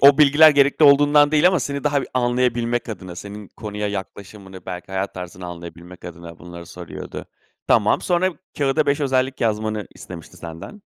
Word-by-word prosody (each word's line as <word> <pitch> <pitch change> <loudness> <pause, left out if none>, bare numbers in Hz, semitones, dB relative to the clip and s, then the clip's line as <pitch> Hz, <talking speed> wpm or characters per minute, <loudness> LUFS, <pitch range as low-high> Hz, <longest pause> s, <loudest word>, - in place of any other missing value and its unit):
o 140 0 +7
bilgiler 150 +1 +7
gerekli 145 +1 +3
olduğundan 145 +1 +6
değil 155 +3 +5
ama 185 -4 +1
seni 140 +1 -4
daha 145 -1 +2 0.2
anlayabilmek 120 -1 0
adına, 95 -5 -8
senin 105 +1 -9
konuya 105 -1 -5
yaklaşımını, 95 -1 -8
belki 90 +1 -7
hayat 95 +1 -3
tarzını 90 0 -8
anlayabilmek 85 +1 -11
adına 85 -1 -10
bunları 85 0 -11
soruyordu. 85 -1 -9 0.4
Tamam, - - +3
sonra 180 +1 +1 0.3
kağıda 145 +2 +1
5 140 +1 +1
özellik 130 -1 0
yazmanı 110 -2 -1
istemişti 85 -3 -11
senden. 85 - -10
110 Hz, 155 wpm, -21 LUFS, 90-140 Hz, 0.4 s, o